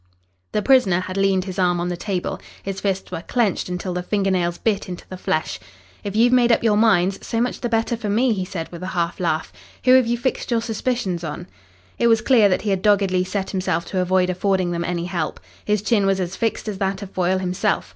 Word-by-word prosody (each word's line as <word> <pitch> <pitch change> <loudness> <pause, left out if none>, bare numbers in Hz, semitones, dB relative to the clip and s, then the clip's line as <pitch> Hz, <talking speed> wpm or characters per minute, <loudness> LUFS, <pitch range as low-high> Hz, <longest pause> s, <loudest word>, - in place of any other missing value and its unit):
The 210 - 0
prisoner 225 -10 +4
had 185 0 -6
leaned 195 -1 +2
his 190 0 -5
arm 175 -1 +2
on 175 +1 -1
the 175 - -2
table. 180 0 -3 0.2
His 195 0 -4
fists 195 -1 -2
were - - -4
clenched 215 -2 0
until 180 0 -3
the 180 - -2
finger 195 +1 0
nails 175 -2 0
bit 205 -3 -1
into 180 - -8
the 185 - -6
flesh. 155 -3 -2 0.4
"If 200 0 -5
you've 240 +3 +4
made 245 -1 +5
up 230 - +3
your 220 -2 +3
minds, 195 -4 +3
so 230 - -2
much 245 +1 -1
the 240 - -1
better 225 +1 +1
for 225 -2 -4
me," 235 +4 +3
he 190 -3 -2
said 180 -3 -5
with 170 0 -8
a 185 - -4
half 170 0 -1
laugh. 165 -3 -1 0.3
"Who 255 - +6
have 260 -2 +6
you 240 +1 +1
fixed 260 +2 -2
your 235 -2 +1
suspicions 225 -6 -2
on?" 160 +2 -5 0.5
It 235 - +4
was 225 -1 +4
clear 230 -4 +5
that 185 - 0
he 210 - 0
had 190 -1 0
doggedly 195 -3 +3
set 190 +1 -3
himself 180 -3 -1
to 185 - +1
avoid 185 0 +2
affording 185 -1 0
them 170 0 -2
any 175 0 -2
help. 175 -4 -3 0.3
His 210 -1 +1
chin 210 -3 +2
was 195 -1 +2
as 180 -1 -3
fixed 225 -1 -2
as 200 -3 -4
that 195 0 -1
of 195 - -9
Foyle 185 +1 +1
himself. 180 - -1
195 Hz, 235 wpm, -22 LUFS, 180-220 Hz, 0.5 s, Who